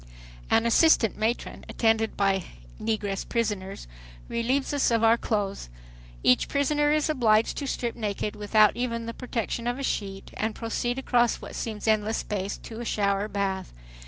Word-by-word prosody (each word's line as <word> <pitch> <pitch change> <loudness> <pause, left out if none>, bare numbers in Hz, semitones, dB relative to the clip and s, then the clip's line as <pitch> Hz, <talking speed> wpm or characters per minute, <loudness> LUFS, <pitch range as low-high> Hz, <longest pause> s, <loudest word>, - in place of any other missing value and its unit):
An 225 - +3
assistant 235 -2 +4
matron, 220 +3 -2
attended 225 -1 +1
by 195 -2 +1 0.4
negress 210 -3 -1
prisoners, 205 - -2 0.4
relieves 255 +5 0
us 285 - +2
of 230 -1 +2
our 225 0 +6
clothes. 205 - -2 0.5
Each 125 - +4
prisoner 295 +1 +1
is 305 0 +2
obliged 230 -7 +3
to 280 - -3
strip 240 -3 -2
naked 210 -1 -3
without 210 0 +4
even 230 -2 -2
the 230 - -5
protection 235 -1 -3
of 245 +1 -1
a 275 - -5
sheet, 195 -6 -3
and 220 0 -1
proceed 240 +2 -2
across 240 -3 +2
what - - -10
seems 220 -1 -4
endless 215 0 +2
space, 200 -1 -3
to 225 0 -9
a - - -4
shower 200 -2 0
bath. 195 -2 -2
225 Hz, 160 wpm, -26 LUFS, 205-240 Hz, 0.5 s, our